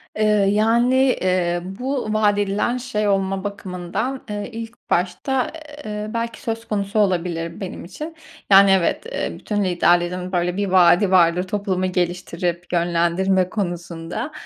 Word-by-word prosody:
Eee, 215 - 0 0.3
yani, 230 +4 +3
eee, 185 -9 +2 0.2
bu 255 -4 -2
vaat 210 -1 +3
edilen 205 +4 0
şey 215 -4 -2
olma 195 -1 0
bakımından, 200 +5 -4
eee, 205 +2 -4
ilk 230 +1 -9
başta, 185 +9 0 0.3
eee, 210 0 -4
belki 230 0 -3
söz 225 0 -4
konusu 205 0 -1
olabilir 170 -4 0
benim 185 -2 -6
için. 305 - -8 0.4
Yani, 195 0 +8
evet, 190 - +2
eee, - - -2
bütün 205 -1 -1
liderlerin 175 0 +1
böyle 180 0 0
bir 200 0 0
vaadi 185 +1 +5
vardır 175 -1 +4
toplumu 185 -1 -1
geliştirip 175 -1 -2
yönlendirme 175 +2 +1
konusunda. 175 - -4
190 Hz, 135 wpm, -21 LUFS, 175-215 Hz, 0.4 s, Yani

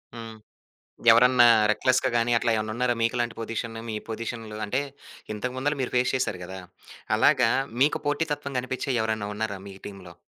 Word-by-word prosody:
హ్మ్. 115 -1 -9 0.7
ఎవరన్నా 125 +1 +6 0.3
రెక్లెస్‌గా 130 +4 +1
గాని, 120 0 +2
అట్లా 115 - +1
ఏమనన్నున్నారా? 115 +3 -1
మీకు 115 - +1
లాంటి 120 -1 -1
పొజిషను 115 0 -4
మీ 110 - -3
పొజిషన్‌లో 110 -1 -5
అంటే 125 +7 -1 0.5
ఇంతకు 125 +4 -4
ముందులా 145 +3 -1
మీరు 125 - -3
ఫేస్ 125 0 +2
చేసారు 110 -7 -1
కదా! 95 +1 -8 0.6
అలాగా - - +4 0.3
మీకు 145 +2 +3
పోటీతత్వం 145 -2 -2
గనిపించే 130 +2 -3
ఎవరైనా 110 -2 -2
ఉన్నారా 105 -2 -3
మీ 100 - -9
టీమ్‌లో? 95 -3 -11
115 Hz, 150 wpm, -26 LUFS, 110-130 Hz, 0.7 s, ఎవరన్నా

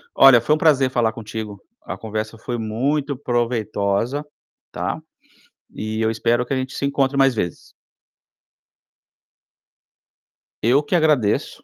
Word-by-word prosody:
Olha 135 -3 +8
foi 150 +6 +2
um - - -2
prazer 140 -5 +3
falar 115 -3 +1
contigo, 110 -2 -7 0.2
a - - -6
conversa 110 0 -5
foi 120 +2 -4
muito 135 +7 -1
proveitosa, 115 +1 -1 0.5
tá, - - -3 0.7
e 110 +1 -4
eu 110 0 +2
espero 120 +2 0
que 135 - -1
a - - -1
gente 130 +1 -3
se - - -4
encontre 140 0 0
mais 135 -2 +4
vezes. 85 -6 -4 2.9
Eu 130 +6 +4
que 145 - -5
agradeço, 150 -10 +1
120 Hz, 130 wpm, -21 LUFS, 110-135 Hz, 2.9 s, Olha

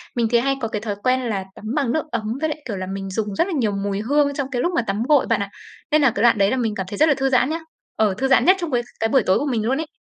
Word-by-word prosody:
Mình 235 -2 +1
thì 235 - +5
hay 275 +3 +1
có 230 - -1
cái 210 -1 -4
thói 210 -2 -3
quen 255 0 +2
là 215 -6 -2
tắm - - -12
bằng 275 -6 +1
nước 315 - 0
ấm 230 -2 -2 0.2
với 315 - +1
lại, 305 - -4
kiểu 205 -5 -4
là, 185 - -4
mình 195 0 -5
dùng 205 +1 -3
rất 335 - +1
là 385 - -3
nhiều 240 -9 +1
mùi 200 0 -2
hương 285 +5 +2
trong 275 -2 -3
cái 245 -2 -1
lúc 350 - 0
mà - - +3
tắm 200 +3 -1
gội, 295 -3 +5
bạn 230 -3 +1
ạ, 200 - -3 0.4
nên 305 0 +4
là 270 -4 +4
cái - - 0
đoạn 235 -2 +5
đấy 195 0 +3
là 260 - 0
mình 225 -4 -1
cảm 190 - -3
thấy 205 - -6
rất 315 - +4
là 290 - +4
thư 270 0 +1
giãn 255 0 +3
nhá. 325 +1 -2 0.4
Ờ, 215 -3 +2
thư 270 +4 0
giãn 270 - +4
nhất 370 - +6
trong 340 -4 -4
cái 245 -2 +2 0.2
cái 225 - +1
buổi 260 0 +3
tối 185 - +3
của 290 - -2
mình 235 -6 -1
luôn 260 +4 +1
ấy. 320 - -6
240 Hz, 350 wpm, -21 LUFS, 210-275 Hz, 0.4 s, nhất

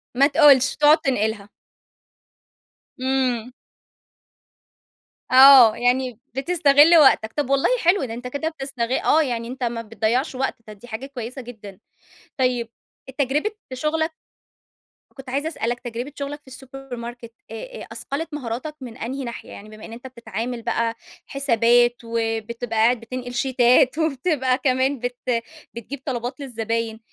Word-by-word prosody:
ما 275 +3 +5
تقولش! 285 -3 +5
تقعد 300 +1 +5
تنقلها. 220 -5 -1 1.5
إمم. 255 -2 -1 1.8
آه، 260 -4 +9
يعني 245 -1 0 0.2
بتستغل 295 +2 +5
وقتك. 245 -7 +4
طب 290 -3 -2
والله 275 0 +2
حلو، 355 +4 +3
ده 225 - -6
أنتَ 245 +2 -7
كده 285 +5 -3
بتستغ 270 -6 -4
آه، 315 - +4
يعني 235 -4 -3
أنتَ 255 +2 -6
ما 235 -1 -2
بتضيّعش 230 +5 -1
وقت، 265 +1 -2
طب 215 - -9
دي 245 - -14
حاجة 235 +3 -6
كويسة 255 -1 -7
جدًا. 215 -6 -11 0.6
طيب 250 -3 0 0.4
التجربة 280 +7 -1 0.2
في 255 - -7
شغلك 315 +4 -1 1.0
كنت 270 -1 -10
عايزة 280 +4 -2
اسألك 240 -6 -3
تجربة 240 +3 -6
شغلك 285 +1 -5
في - - -38
السوبر 265 0 -10
ماركت، 235 0 -9 0.2
آآ، 485 - -8
أثقلت 300 +3 -5
مهاراتك 275 +2 -5
من 240 -2 -9
أنهي 265 +4 -5
ناحية؟ 235 -2 -8
يعني 210 +2 -11
بما 215 0 -12
إن 225 - -10
أنتَ 240 +3 -9
بتتعامل 235 -1 -6
بقى 230 0 -1 0.3
حسابات، 240 -3 +3
وبتبقى 230 0 -3
قاعد 235 +2 +3
بتنقل 245 +1 -7
شيتات، 255 +2 +3
وبتبقى 275 -4 0
كمان 260 +1 0
بت 245 +1 -4 0.6
بتجيب 235 +4 -7
طلبات 245 0 -4
للزباين 230 -3 -3
255 Hz, 135 wpm, -22 LUFS, 230-275 Hz, 1.8 s, آه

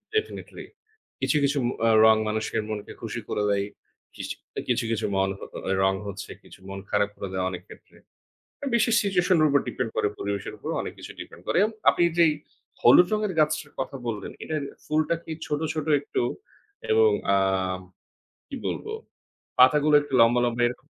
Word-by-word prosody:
ডেফেনেটলি 435 0 -3 0.6
কিছু, 150 - +2
কিছু, 140 +1 +2 0.3
আ - - +5 0.2
রং 110 0 +7
মানুষের 110 0 -1
মনকে 105 -1 -5
খুশি - - -4
করে 105 - -1
দেয়। 100 0 +1 0.5
কিসি - - -5 0.2
অ্যা - - -2
কিছু, 125 0 +2
কিছু, 115 - -1
মানহো 95 0 -1 0.2
অ্যা 95 - 0
রং 95 0 +3
হচ্ছে, 100 0 -7
কিছু - - -15
মন 95 0 -6
খারাপ 105 0 +2
করে 100 - -5
দেয় 95 0 -1
অনেক 90 -1 -6
ক্ষেত্রে। - - -16 0.6
অ্যা 280 - -2
বিশেষ 230 0 +3
situation 185 -2 +2
এর 155 - +5
উপর 140 -1 +4
ডিপেন্ড 120 -3 -2
করে - - +2
পরিবেশের 100 -1 -3
উপর - - -7
অনেক - - -5
কিছু - - -9
ডিপেন - - -10
করে। - - +1
অ্যান 215 +2 +1 0.2
আপনি - - 0 0.2
যেই, 165 -3 +6 0.5
হলুদ 175 +9 +7
রঙের 210 -2 0
গাছটার 150 -1 +1
কথা 135 +1 -4
বললেন, 110 -3 -4
এটার 155 -2 -2 0.2
ফুলটা 155 +2 +1
কি 160 - -6
ছোট, 150 0 -1
ছোট, 155 -1 -3
একটু 145 - -2 0.7
এবং 110 -1 +5 0.3
আম 95 -1 0 0.7
কি - - -6
বলব, - - -4 0.7
পাতাগুলো 150 +4 +6
একটু 145 -2 -10
লম্বা, 120 +1 +5
লম্বা 120 0 0
এরক 125 - -5
125 Hz, 175 wpm, -26 LUFS, 100-155 Hz, 0.7 s, রং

